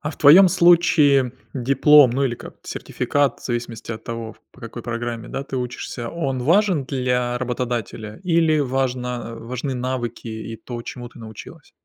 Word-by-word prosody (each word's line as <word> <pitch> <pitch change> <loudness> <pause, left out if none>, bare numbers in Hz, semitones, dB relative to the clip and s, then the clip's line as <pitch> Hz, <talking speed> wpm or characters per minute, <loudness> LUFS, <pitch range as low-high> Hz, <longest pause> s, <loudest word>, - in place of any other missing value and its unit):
А 150 - -3
в - - -11
твоем 170 +6 +8
случае 165 -7 +4 0.2
диплом, 140 +2 +5
ну, 135 +3 0
или 125 -3 0
как, - - -11
сертификат, 145 -3 -1
в - - -15
зависимости 120 -2 -4
от 110 0 -9
того, 115 -1 -5
в - - -25
по - - -19
какой 115 0 -8
программе, 120 -1 -4
да, 135 - -4
ты 135 - -6
учишься, 125 -1 -5
он 135 -5 -2
важен 175 0 +3
для 125 -2 -1
работодателя 120 -3 -4
или 165 -3 +2
важно 125 -3 -2
важны 125 +4 -4
навыки 125 -2 -4
и 110 +1 -6
то, 120 +2 -7
чему 120 0 -8
ты - - -17
научилась? 110 -2 -11
125 Hz, 165 wpm, -22 LUFS, 120-140 Hz, 0.2 s, твоем